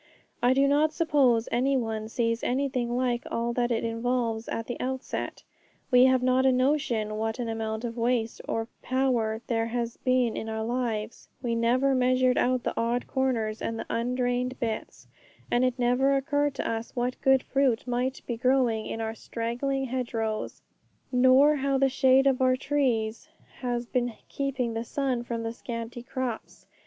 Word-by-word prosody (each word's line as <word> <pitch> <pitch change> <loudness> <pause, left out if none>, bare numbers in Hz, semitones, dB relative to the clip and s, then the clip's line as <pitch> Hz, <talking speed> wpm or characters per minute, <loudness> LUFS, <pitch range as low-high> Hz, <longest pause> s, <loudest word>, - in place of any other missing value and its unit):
I 250 +1 +4
do 275 +1 +4
not 295 +2 +3
suppose 275 -9 +3
any 265 +3 +2
one 220 -3 -3
sees 230 0 -1
anything 250 -2 0
like 245 -1 0
all 235 +1 -1
that 240 0 0
it 230 -2 0
involves 230 0 -1
at 230 - -3
the 245 - -5
outset. 260 +1 -4 0.5
We 250 0 +7
have 260 -1 +3
not 255 +1 +3
a 265 - +5
notion 250 -5 +1
what 220 0 -1
an 245 -2 -3
amount 220 0 -3
of 235 0 -5
waste 230 -1 0
of 225 0 -1
power 245 -4 0
there 225 -1 0
has 235 0 -3
been 255 -3 +1
in 220 - -4
our 220 0 -3
lives; 230 -3 -3 0.2
we 235 -1 0
never 245 +4 +2
measured 255 0 +3
out 250 0 +1
the - - -1
odd 235 +2 0
corners 235 -5 -1
and 225 - -2
the - - -5
undrained 250 +1 -1
bits, 225 -4 -4 0.5
and 240 +1 +3
it 255 0 +1
never 250 +3 +3
occurred 285 +1 0
to - - -3
us 225 0 -4
what 250 0 -2
good 265 -1 +4
fruit 270 -4 +1
might 250 +1 -2
be 235 - -3
grown 255 0 +3 0.2
in 225 - -4
our 220 0 -2
straggling 245 +5 -3
hedgerows, 235 -4 -3 0.5
nor 260 +4 +5
how 275 0 +1
the 270 0 +3
shade 265 0 +4
of 265 -2 +2
our 255 0 +4
trees 255 -3 -1 0.3
has 245 -1 -2
been 245 -1 -1
keeping 265 -4 -2
the 225 0 -2
sun 255 0 -1
from 235 -1 -4
the 225 0 -3
scanty 230 0 -6
crops. 250 -2 -5
245 Hz, 170 wpm, -27 LUFS, 230-260 Hz, 0.5 s, We